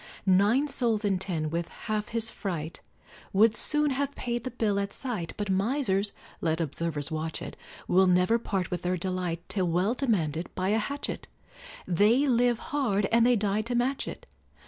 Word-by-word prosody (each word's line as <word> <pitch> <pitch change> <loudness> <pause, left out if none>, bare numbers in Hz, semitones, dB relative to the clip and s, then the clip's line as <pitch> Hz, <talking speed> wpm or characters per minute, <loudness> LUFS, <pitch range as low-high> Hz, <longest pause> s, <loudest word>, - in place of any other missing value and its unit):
Nine 205 +9 +4
souls 230 -6 0
in 195 -2 +1
ten, 160 -5 -3
with 170 0 -2
half 215 -1 -4
his 230 -1 0
fright, 170 -5 -5 0.5
Would 215 +3 +5
soon 300 -1 +2
have 280 +1 -2
paid 240 -1 -3
the 255 - -3
bill 220 -5 0
at 200 0 -2
sight, 220 -11 -4
But 205 -2 -2
misers 200 -1 +1 0.3
(let 160 0 0
observers 155 -2 -2
watch 160 0 -3
it) - - -7 0.3
Will 190 +1 +4
never 180 +6 +3
part 195 -6 -2
with 175 -1 -2
their 180 0 0
delight 180 -1 -3
Till 185 -3 0
well 180 +6 +1
demanded 180 - -1
by 185 +1 0
a 215 +2 +3
hatchet 280 +6 -4 0.6
They 210 - +4
live 245 -2 +3 0.2
hard 210 -9 +1
and 235 +1 +5
they 245 - +5
die 205 0 +1
to 235 +3 -3
match 255 +3 0
it. - - -7
205 Hz, 175 wpm, -28 LUFS, 180-235 Hz, 0.6 s, Would